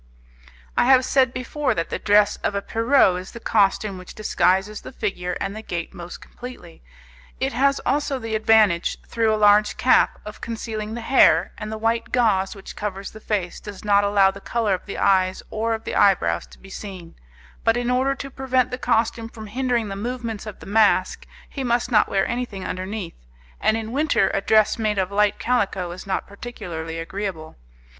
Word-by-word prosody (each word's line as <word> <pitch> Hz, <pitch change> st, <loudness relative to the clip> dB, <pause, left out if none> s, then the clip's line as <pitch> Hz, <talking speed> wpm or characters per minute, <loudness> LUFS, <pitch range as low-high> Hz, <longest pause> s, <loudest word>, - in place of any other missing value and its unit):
I -, -, +3 dB
have 260 Hz, 0 st, +5 dB
said 260 Hz, -2 st, +3 dB
before 265 Hz, +4 st, -2 dB
that 165 Hz, -, -3 dB
the -, -, -2 dB
dress 205 Hz, 0 st, +3 dB
of 200 Hz, -, -2 dB
a 200 Hz, -, 0 dB
Pierrot 225 Hz, -6 st, +3 dB
is 185 Hz, -, -11 dB
the 235 Hz, -, -8 dB
costume 200 Hz, -3 st, +1 dB
which 180 Hz, -, -11 dB
disguises 205 Hz, -1 st, +1 dB
the -, -, -9 dB
figure 195 Hz, -7 st, -3 dB
and 195 Hz, +1 st, -3 dB
the 220 Hz, -, -6 dB
gait 170 Hz, -5 st, -5 dB
most 175 Hz, 0 st, -9 dB
completely. 245 Hz, -9 st, -11 dB, 0.6 s
It -, -, -1 dB
has 275 Hz, +3 st, +2 dB
also 285 Hz, -1 st, 0 dB
the 225 Hz, -3 st, -5 dB
advantage, 215 Hz, -5 st, +3 dB
through 225 Hz, -1 st, +1 dB
a 215 Hz, -, +1 dB
large 210 Hz, 0 st, +4 dB
cap, -, -, +3 dB
of -, -, -9 dB
concealing 220 Hz, -1 st, -5 dB
the 235 Hz, -, -5 dB
hair, 265 Hz, +3 st, +4 dB
and 215 Hz, 0 st, -5 dB
the 220 Hz, -, -4 dB
white 230 Hz, +1 st, -1 dB
gauze 210 Hz, -6 st, +2 dB
which 195 Hz, -, -10 dB
covers 200 Hz, -1 st, -5 dB
the 220 Hz, -, -11 dB
face 200 Hz, -5 st, -3 dB
does 205 Hz, 0 st, -10 dB
not 205 Hz, -1 st, +4 dB
allow 200 Hz, -1 st, +4 dB
the 200 Hz, +1 st, -12 dB
colour 225 Hz, -3 st, 0 dB
of 185 Hz, -, -4 dB
the 200 Hz, -, -5 dB
eyes 185 Hz, -1 st, +2 dB
or 225 Hz, +1 st, 0 dB
of 220 Hz, -, -9 dB
the -, -, -5 dB
eyebrows 85 Hz, -, +3 dB
to -, -, -17 dB
be 195 Hz, -, -15 dB
seen, 185 Hz, -6 st, -8 dB, 0.5 s
but 225 Hz, +1 st, +3 dB
in 245 Hz, 0 st, -1 dB
order 265 Hz, +2 st, +1 dB
to 275 Hz, 0 st, -7 dB
prevent 255 Hz, -1 st, 0 dB
the 250 Hz, -, -4 dB
costume 230 Hz, -1 st, 0 dB
from 220 Hz, -1 st, -10 dB
hindering 240 Hz, 0 st, -1 dB
the 195 Hz, -, -4 dB
movements 230 Hz, 0 st, -5 dB
of 210 Hz, -, -9 dB
the -, -, -10 dB
mask, 205 Hz, -2 st, +2 dB, 0.2 s
he 275 Hz, -, -5 dB
must 240 Hz, 0 st, 0 dB
not 215 Hz, -, +4 dB
wear 195 Hz, -1 st, +1 dB
anything 235 Hz, -5 st, -4 dB
underneath, 185 Hz, -, -6 dB, 0.3 s
and 220 Hz, -, +2 dB
in 225 Hz, 0 st, -5 dB
winter 280 Hz, -8 st, +2 dB
a 195 Hz, -, 0 dB
dress 215 Hz, +2 st, +3 dB
made 215 Hz, -2 st, 0 dB
of 190 Hz, 0 st, 0 dB
light 210 Hz, 0 st, +2 dB
calico 195 Hz, -7 st, -1 dB
is 185 Hz, +3 st, -9 dB
not 190 Hz, -, -1 dB
particularly 180 Hz, -7 st, -7 dB
agreeable. 165 Hz, -2 st, -5 dB
215 Hz, 195 wpm, -23 LUFS, 195-235 Hz, 0.6 s, have